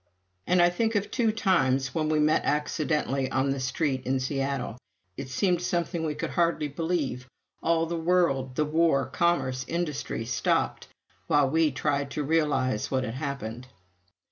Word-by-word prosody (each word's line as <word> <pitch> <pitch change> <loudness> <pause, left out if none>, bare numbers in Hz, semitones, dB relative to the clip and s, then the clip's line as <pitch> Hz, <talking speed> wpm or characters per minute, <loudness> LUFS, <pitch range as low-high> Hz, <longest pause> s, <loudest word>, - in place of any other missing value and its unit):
And 180 -1 +4
I 175 - +5
think 225 +5 0
of 205 -1 0
two 230 -4 +2
times 135 - +1
when 155 -1 0
we 155 - +2
met 150 +1 +3
accidentally 150 -2 0
on 135 +1 +1
the 135 - -2
street 130 +1 -1
in 130 0 +1
Seattle 135 -2 -2 0.4
it 135 +2 -6
seemed 175 +6 +1
something 170 -1 -1
we 155 -2 -2
could - - -4
hardly 170 -3 +1
believe: 150 -5 -2 0.3
all 165 0 +2
the 170 +1 -3
world 160 -7 +1
the 150 - +1
war, 155 -3 +2
commerce, 135 -7 0
industry 155 -8 -3
stopped 120 0 0 0.4
while 145 -2 +4
we 160 0 +3
tried 140 0 -1
to 150 - 0
realize 135 -7 +1
what 130 -1 0
had 115 - -4
happened. 130 -3 -5
150 Hz, 160 wpm, -27 LUFS, 130-170 Hz, 0.4 s, I